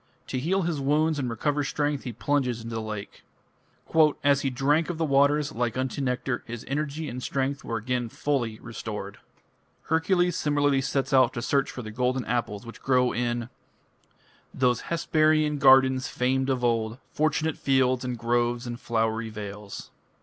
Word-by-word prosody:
To 130 - -1
heal 185 +8 +1
his 165 -4 -1
wounds 150 +2 +2
and 130 -3 -1
recover 145 +6 0
strength 145 0 -1
he 125 - -3
plunges 125 0 -1
into 115 0 -6
the 115 - -2
lake. 105 -2 -7 1.0
"As 140 -1 +4
he 135 - 0
drank 145 +6 +1
of 175 - -3
the 165 - 0
waters, 145 +1 +3
like 120 0 -2
unto 130 +2 -2
nectar, 125 -1 -1
his 120 -1 -7
energy 150 +3 -2
and 125 -1 -5
strength 135 +2 -2
were 115 - -3
again 120 +1 -2
fully 120 -5 -1
restored." 105 -3 -6 0.6
Hercules 175 +2 +2
similarly 145 -2 +2
sets 135 +1 -1
out 130 -1 +5
to 120 - -4
search 140 +1 +1
for 125 - -7
the 110 - -7
golden 125 +2 0
apples 115 -3 -2
which 115 - -10
grow 125 -2 +3
in 120 0 -2 1.0
those 125 -2 +1
Hesperian 155 -2 +2
gardens 130 -1 +5
famed 130 +2 0
of 130 -2 0
old, 115 -1 0
Fortunate 155 +1 0
fields, 130 -2 +2
and 125 -1 -3
groves 120 +1 0
and 120 0 -5
flowery 115 0 -1
vales. 105 -1 -8
130 Hz, 165 wpm, -26 LUFS, 120-145 Hz, 1.0 s, out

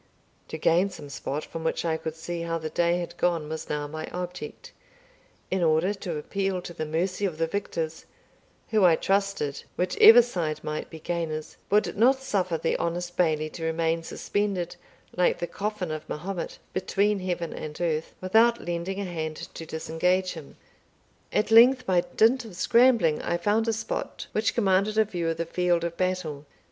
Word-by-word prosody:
To - - -5
gain 170 +5 +3
some 150 -6 -10
spot 140 +2 -4
from 165 - -7
which 160 - -1
I 160 -1 +1
could 160 0 -5
see 170 +1 -5
how 165 0 -2
the 155 -1 -5
day 170 0 +2
had 175 -1 -5
gone 170 -4 +1
was 160 +1 -6
now 150 0 -2
my 155 +2 -6
object, 180 -3 -7 0.8
in 190 0 +1
order 165 +4 +3
to 180 -5 -5
appeal 195 +4 -2
to 175 - -7
the 155 -2 -4
mercy 180 +5 -1
of 180 -6 -1
the 165 - +1
victors, 165 -3 -4 0.6
who, 215 -3 +3
I 175 -3 +7
trusted 195 -7 -1
(whichever 220 +6 +7
side 165 -10 -3
might 155 0 -4
be 160 - -9
gainers), 160 -2 -3
would 210 +1 +2
not 255 +5 +4
suffer 190 -10 -1
the 160 - 0
honest 175 +1 -3
Bailie 155 -3 +1
to 165 - -7
remain 165 0 0
suspended, 190 +1 -2 0.4
like 180 0 +3
the - - -2
coffin 200 -2 -3
of 155 0 -6
Mahomet, 175 +3 -4 0.2
between 200 +2 +1
heaven 175 -2 -3
and 150 -1 -7
earth, 160 -2 -1
without 225 +5 +4
lending 175 +3 -3
a 200 - -2
hand 160 -3 -4 0.2
to 165 - -8
disengage 180 +4 0
him. 160 -5 -11 0.7
At 215 - 0
length, 250 +3 +7
by 180 -4 +3 0.2
dint 245 +4 +5
of 215 -6 -11
scrambling, 230 -8 +4
I 175 - -1
found 210 +5 +1
a - - +3
spot 220 +1 -4
which 215 +1 0
commanded 200 -1 +2
a 220 - +5
view 175 -5 -2
of 165 - -2
the 170 - -1
field 175 0 +1
of 170 0 -3
battle. 170 -6 -2
175 Hz, 180 wpm, -26 LUFS, 160-195 Hz, 0.8 s, I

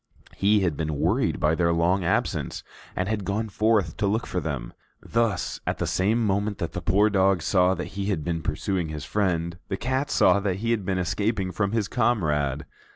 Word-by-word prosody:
He 105 +1 +3
had 85 -5 0
been 75 0 -2
worried - - +1
by 75 +1 +2
their 85 0 +2
long 85 +3 +2
absence 85 - -1 0.3
and 90 - -1
had 105 -1 -1
gone 105 +3 -2
forth 105 -4 +1
to 100 - +1
look 110 +3 0
for 90 - -2
them. 70 -8 -4 0.3
Thus, 115 -6 -1
at - - 0
the - - -1
same 110 +5 +1
moment 100 0 0
that 85 - -3
the 90 - -5
poor 100 +6 +3
dog 95 -3 +3
saw 90 +1 +3
that - - -5
he 100 0 -3
had 95 -7 -1
been 85 0 -2
pursuing 85 +3 -2
his 75 -2 -6
friend, 85 -4 -1
the 95 - -3
cat 130 +5 -1
saw - - +4
that 100 -2 -1
he 115 +5 -2
had 110 -5 0
been 95 -1 0
escaping 95 +2 -1
from 100 +1 -1
his 110 -3 0
comrade. 75 - 0
95 Hz, 205 wpm, -25 LUFS, 85-105 Hz, 0.3 s, saw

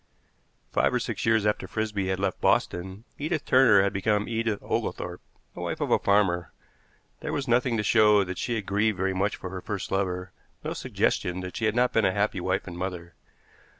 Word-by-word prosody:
Five - - +2
or - - +2
six - - -3
years 110 -2 +3
after 105 - 0
Frisby 105 -3 -2
had 95 0 -1
left 95 -1 -2
Boston, 95 +4 0 0.2
Edith 155 +1 -2
Turner 120 -7 +6
had 100 - 0
become 105 +2 +1
Edith 115 -2 -1
Oglethorpe, - - -3 0.3
the - - -10
wife - - -3
of - - -2
a - - +5
farmer. 100 -4 +2 0.7
There - - -4
was 140 -1 -2
nothing 120 0 +2
to 105 - 0
show 105 -2 +5
that 90 -1 -6
she 120 - -1
had 105 -3 -3
grieved 105 +1 +1
very 95 +1 0
much 100 +2 0
for 90 - -7
her 95 -1 -5
first 100 -1 -5
lover, 90 -1 -1 0.3
no - - -3
suggestion 90 +1 -1
that 90 0 -7
she 110 - -1
had 110 0 +1
not 125 0 +2
been 110 - +3
a 95 - +2
happy 100 0 0
wife 95 +2 -1
and 90 - -7
mother. 90 -2 -5
100 Hz, 205 wpm, -27 LUFS, 95-110 Hz, 0.7 s, Turner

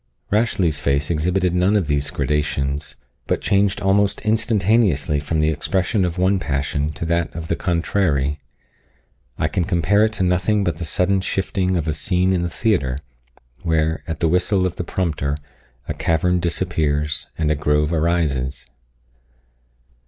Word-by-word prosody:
Rashleigh's 100 -7 +1
face 70 +3 0
exhibited 90 +3 +1
none 90 +4 +2
of 100 -5 +2
these 75 -1 0
gradations, 70 -1 -2 0.3
but - - 0
changed 100 0 +1
almost 100 +1 +2
instantaneously 105 - +2
from 75 +2 -1
the 75 - +3
expression 95 - 0
of 90 0 -3
one 95 +2 +2
passion 75 -1 -1
to 85 - -5
that 85 0 0
of 80 0 -6
the 85 - +1
contrary. 85 -6 0 1.0
I 75 - +1
can 90 +3 -1
compare 95 +3 +2
it 110 - -2
to 95 - -1
nothing 90 +3 +1
but 85 -3 -2
the 85 - -3
sudden 95 +4 +1
shifting 95 -1 -1
of 80 -2 -2
a 80 - +1
scene 90 +4 +1
in 90 - +1
the 85 - -1
theatre, 85 - 0 0.6
where, 80 -2 0
at 80 -1 -5
the 85 - +3
whistle 90 +3 +2
of 90 - -3
the - - -2
prompter, 80 -5 -2 0.5
a - - -2
cavern 90 +2 +1
disappears, 80 -4 -1
and 75 -2 +1
a - - +2
grove 75 +2 +1
arises. 75 -5 0
85 Hz, 155 wpm, -21 LUFS, 75-95 Hz, 1.0 s, the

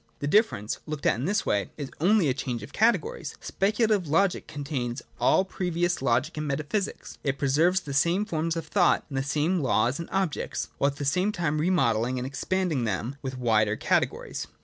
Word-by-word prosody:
The - - -4
difference, 145 - +2
looked 150 -2 -5
at - - +5
in 130 - -2
this 200 +3 0
way, 100 -1 0
is 145 -3 -5
only 195 -1 +4
a 130 - +2
change 125 -4 -4
of 105 - -10
categories. 330 - +1
Speculative 210 -2 +1
Logic 180 +5 +1
con 145 -1 -6
tains 130 -4 -3 0.2
all 190 - +4
previous 175 -3 -1
Logic 135 +4 +1
and 150 0 -2
Metaphysics: 150 +8 -3
it 140 -1 -1
preserves 160 +7 +2
the 140 - -6
same 170 +8 +2
forms 165 -3 -1
of 165 - -4
thought, 175 +2 +2
the 135 -1 -1
same 150 +6 0
laws 125 0 +1
and 170 - -6
objects, 190 -5 -2
— - - -36
while 140 - +3
at 140 - -7
the 145 - -3
same 180 +9 +2
time 160 -6 -1
remodelling 130 -8 +2
and 125 - -3
expanding 155 +2 -1
them 115 +5 -2
with 130 -1 -5
wider 110 -4 +2
categories. - - -1
150 Hz, 195 wpm, -27 LUFS, 130-185 Hz, 0.2 s, at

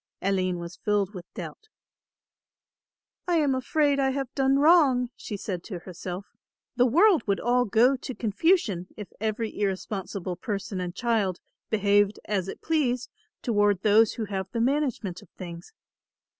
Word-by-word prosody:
Aline 185 -2 +1
was 170 0 -8
filled 205 -1 0
with 180 -2 -10
doubt. 435 - -8 1.6
"I 350 - +2
am 295 -4 +3
afraid 280 +2 +1
I 270 -1 +3
have 270 -1 -3
done 270 0 +2
wrong," 280 -6 +5
she 205 - -6
said 185 -3 -4
to 195 - -5
herself; 180 +2 -7 0.5
"the 250 0 +4
world 345 - +5
would 200 -1 +1
all 245 +1 +2
go 235 +5 +4
to 255 0 -7
confusion 220 - +1
if 210 -2 -9
every 220 +1 -2
irresponsible 190 -2 -3
person 200 -3 -4
and 180 0 -5
child 220 -7 0 0.3
behaved 205 -1 +2
as 195 -3 -1
it - - -8
pleased 255 -7 0 0.3
toward 205 -4 +2
those 215 +1 +5
who 225 - -3
have 190 -2 -3
the 235 - -2
management 245 -8 0
of - - -18
things. 170 -1 -8
215 Hz, 150 wpm, -26 LUFS, 190-260 Hz, 1.6 s, wrong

